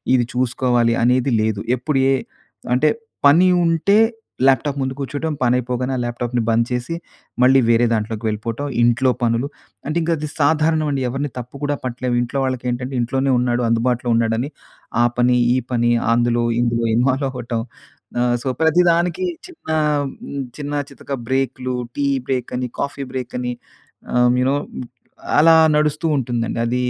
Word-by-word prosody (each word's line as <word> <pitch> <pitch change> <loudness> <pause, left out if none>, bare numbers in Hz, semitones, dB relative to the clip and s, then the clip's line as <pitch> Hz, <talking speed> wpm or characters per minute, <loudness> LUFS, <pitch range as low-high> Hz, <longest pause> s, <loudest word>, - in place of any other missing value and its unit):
ఇది 120 -2 +2
చూసుకోవాలి 125 -1 +1
అనేది 125 +2 +2
లేదు. 110 -2 -1 0.2
ఎప్పుడు 135 +3 -1
ఏ - - +4 0.6
అంటే 150 +4 +3 0.4
పని 165 +6 +6 0.2
ఉంటే 165 +5 +3 0.5
ల్యాప్టాప్ 135 +2 +2
ముందు 130 0 -1
కూర్చోవటం, 145 +3 -3
పనైపోగానే 125 +1 0
ఆ - - -2
ల్యాప్టాప్‌ని 120 0 -2
బంద్ 115 +1 +3
చేసి 125 +6 -2 0.5
మళ్ళీ 135 +1 +6
వేరే 120 +1 +4
దాంట్లోకి 110 0 -2
వెళ్ళిపోవటం. 115 +5 -4 0.2
ఇంట్లో 125 +2 +3
పనులు 115 +3 +1 0.4
అంటే 155 +3 -1
ఇంకా 165 +1 +1
అది 150 0 -5
సాధారణం 155 +1 +2
అండి. 135 -2 -1
ఎవరిని 135 +2 -3
తప్పు 125 +2 -9
కూడా 145 0 0
పట్టలేము. 125 0 -2
ఇంట్లో 130 +3 -3
వాళ్ళకేంటంటే 125 0 -3
ఇంట్లోనే 135 +3 0
ఉన్నాడు, 120 0 0
అందుబాటులో 120 +1 +1
ఉన్నాడని, 115 +4 0 0.5
ఆ - - +5
పని 125 0 +4 0.2
ఈ - - +2 0.2
పని 120 0 +2 0.2
అందులో 120 0 +2 0.2
ఇందులో 115 -1 0
ఇన్వాల్వ్ 130 +3 +1
అవ్వటం 120 -2 -4 0.6
ఆహ్, 120 0 +2
సో 130 - -2
ప్రతిదానికి 170 - +3 0.2
చిన్న 355 - -13 0.6
హ్మ్, 140 -1 -4
చిన్న 145 -1 -5 0.2
చితక 140 0 -8
బ్రేకులు, 130 -1 -1 0.2
టీ 145 - 0 0.2
బ్రేక్ 125 -2 -2
అని, 125 0 -2
కాఫీ 140 0 -3
బ్రేక్ 130 -2 -5
అని, 125 0 -2 0.6
ఆ - - -2 0.2
యు 125 - +2
నో 140 - +2 0.8
అలా 165 +2 +7 0.2
నడుస్తూ 150 +2 +1
ఉంటుందండి 120 -3 -2
అది 120 +1 -1
125 Hz, 150 wpm, -20 LUFS, 120-140 Hz, 0.8 s, అలా